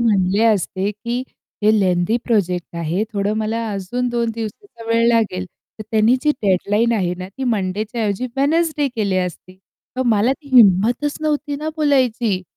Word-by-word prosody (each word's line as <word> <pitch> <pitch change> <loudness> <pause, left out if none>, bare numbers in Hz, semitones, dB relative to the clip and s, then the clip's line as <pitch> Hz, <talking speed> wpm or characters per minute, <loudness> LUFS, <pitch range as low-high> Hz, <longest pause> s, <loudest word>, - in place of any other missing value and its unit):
म्हटले 200 -2 +2
असते, 200 -2 +1
की 235 +4 -4 0.4
"हे 210 - +5
लेंदी 180 +2 +1
प्रोजेक्ट 180 -7 -1
आहे. 170 +5 -1
थोडं 205 0 -1
मला 220 +1 -2
अजून 205 +6 -2
2 235 -1 -1
दिवसाचा 230 - -8
वेळ 230 0 +3
लागेल." 215 -6 +1 0.3
तर - - -5
त्यांनी 220 +3 +4
जी 300 - +3
डेडलाईन 205 +4 +2
आहे 180 -5 0
ना 185 0 -6
ती 265 +7 -6
मंडेच्या 215 0 -2
ऐवजी 205 +4 -1
वेडनेसडे 300 +1 +1
केली 200 -4 0
असती 185 0 -5 0.4
तर 260 - +1
मला 215 +5 +2
ती 280 +1 -12
हिंमतच 235 +7 +4
नव्हती 295 -2 -1
ना 305 +2 -4
बोलायची. 250 -9 +1
220 Hz, 160 wpm, -19 LUFS, 195-245 Hz, 0.4 s, हे